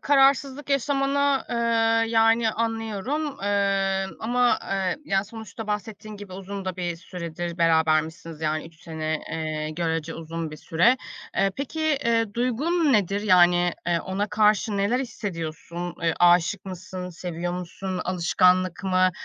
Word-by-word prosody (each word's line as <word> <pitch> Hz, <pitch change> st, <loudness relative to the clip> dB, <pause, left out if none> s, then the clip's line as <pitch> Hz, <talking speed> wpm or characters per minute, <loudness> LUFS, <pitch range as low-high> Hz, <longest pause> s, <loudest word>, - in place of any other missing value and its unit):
Kararsızlık 275 Hz, 0 st, +3 dB
yaşamanı, 275 Hz, 0 st, +1 dB
ııı, 230 Hz, -1 st, +2 dB
yani 225 Hz, 0 st, +4 dB
anlıyorum. 225 Hz, +5 st, -2 dB, 0.2 s
Iıı, 195 Hz, -1 st, 0 dB
ama, 245 Hz, +2 st, +2 dB
ııı, 190 Hz, -2 st, -1 dB
yani 195 Hz, -3 st, +1 dB
sonuçta 220 Hz, 0 st, -9 dB
bahsettiğin 210 Hz, 0 st, -5 dB
gibi 200 Hz, -2 st, -10 dB
uzun 195 Hz, +1 st, -6 dB
da 185 Hz, -1 st, -3 dB
bir 175 Hz, -2 st, -3 dB
süredir 170 Hz, -1 st, -6 dB
berabermişsiniz. 160 Hz, -1 st, +1 dB
Yani 155 Hz, 0 st, -1 dB
3 165 Hz, +1 st, -18 dB
sene, 155 Hz, -1 st, -3 dB
eee, 155 Hz, -1 st, -3 dB
görece 165 Hz, 0 st, -2 dB
uzun 165 Hz, 0 st, -5 dB
bir 155 Hz, -, -8 dB
süre. 180 Hz, -, +3 dB, 0.4 s
Eee, 195 Hz, 0 st, +3 dB
peki, 305 Hz, +1 st, -1 dB
ııı, 230 Hz, -3 st, +1 dB
duygun 280 Hz, +6 st, +1 dB
nedir? 200 Hz, -1 st, +2 dB
Yani, 175 Hz, -3 st, +4 dB, 0.2 s
ııı, 170 Hz, -1 st, +1 dB
ona 200 Hz, +3 st, -2 dB
karşı 210 Hz, 0 st, +2 dB
neler 205 Hz, +6 st, +1 dB
hissediyorsun? 175 Hz, -6 st, -5 dB
Eee, 165 Hz, -1 st, +2 dB
aşık 175 Hz, +3 st, +4 dB
mısın, 185 Hz, -1 st, -7 dB
seviyor 175 Hz, 0 st, -4 dB
musun, 180 Hz, +1 st, -4 dB
alışkanlık 185 Hz, +1 st, +2 dB
mı, 185 Hz, -1 st, +3 dB
195 Hz, 135 wpm, -25 LUFS, 170-225 Hz, 0.4 s, yani